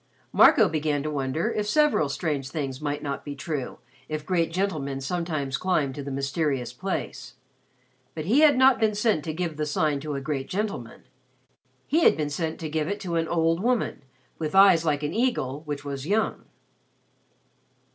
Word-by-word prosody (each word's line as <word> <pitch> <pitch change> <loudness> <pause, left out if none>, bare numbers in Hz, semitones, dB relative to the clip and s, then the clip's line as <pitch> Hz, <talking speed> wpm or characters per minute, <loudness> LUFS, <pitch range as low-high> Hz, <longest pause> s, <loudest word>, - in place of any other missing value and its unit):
Marco - - +7
began 150 -2 -1
to 155 - -3
wonder 145 - -1
if 210 -2 -2
several 295 - +3
strange 140 -3 -2
things 135 -3 -4
might 145 -1 -3
not 140 -1 -4
be 145 - -6
true 140 -2 -4 0.3
if 155 -1 -4
great 170 -2 +1
gentlemen 155 -7 -2
sometimes 155 -2 -2
climbed 155 -8 0
to 145 - -6
the 140 - -6
mysterious 135 -2 -2
place. 135 -6 -5 0.8
But 155 -2 -4
he 230 - +3
had 300 -3 +6
not 260 -1 +5
been 215 -2 +2
sent 210 -7 +1
to 160 - -2
give 160 -1 -3
the 155 - -1
Sign 150 -1 0
to 150 0 -4
a - - -2
great 135 -1 -4
gentleman. 195 - -4 0.8
He 310 - +2
had - - +5
been 150 -2 -2
sent 160 +2 -3
to 160 - -3
give 155 0 -1
it 205 +2 -3
to 175 -3 -3
an 165 0 0
old 165 +1 +1
woman 240 -6 0 0.4
with 155 +2 -3
eyes 195 -4 +7
like 150 -2 0
an 145 - -2
eagle 155 - 0
which 145 -1 -4
was 140 0 -5
young. 215 +3 0
155 Hz, 180 wpm, -26 LUFS, 140-185 Hz, 0.8 s, Marco